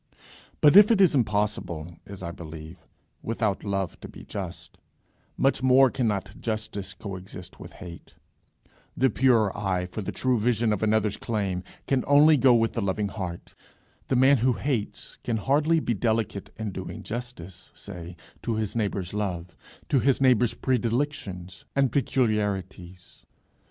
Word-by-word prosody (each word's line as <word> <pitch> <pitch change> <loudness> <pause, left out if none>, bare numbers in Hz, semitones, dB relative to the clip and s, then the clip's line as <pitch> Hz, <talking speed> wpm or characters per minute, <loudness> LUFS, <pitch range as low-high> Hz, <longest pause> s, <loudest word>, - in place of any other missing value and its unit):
But 150 +2 +6
if 205 +1 +9
it 225 -4 +4
is 190 -5 +5
impossible, 105 - -1
as 100 -2 -9
I 85 - -4
believe, 80 0 -10 0.3
without 110 -3 -1
love 95 -3 -2
to - - -9
be - - -12
just, 95 -4 -8 0.6
much 135 0 +2
more 130 0 +5
cannot 110 -7 -2
justice 105 -3 -4
co 100 0 -6
exist 95 +1 -10
with - - -10
hate. 85 -2 -11 0.8
The 130 0 +3
pure 115 -6 +3
eye 95 -3 -1
for 90 +4 -6
the 95 - -4
true 130 -2 0
vision 115 -1 +1
of 105 - -3
another's 110 -1 +1
claims 100 -5 -2 0.2
can 135 -2 +1
only 145 +2 +7
go 130 -3 +5
with 115 -1 +2
the 115 - -2
loving 100 +1 -1
heart. 90 -4 -6 0.5
The - - +1
man 135 +3 +5
who 125 +2 +2
hates 125 -5 -3
can 115 -2 -1
hardly 150 +8 +2
be 120 - -1
delicate 110 -2 -1
in 110 -2 -4
doing 95 0 -7
justice, 105 -7 -7
say 90 -3 -9 0.3
to 115 - -2
his 110 -1 -2
neighbour's 100 -5 -2
love, 90 -5 -3 0.3
to 135 - +3
his 135 +1 +2
neighbour's 125 -3 +3
predilections 115 -7 -2
and 135 -3 +3
peculiarities. 100 - -2
110 Hz, 150 wpm, -26 LUFS, 95-125 Hz, 0.8 s, if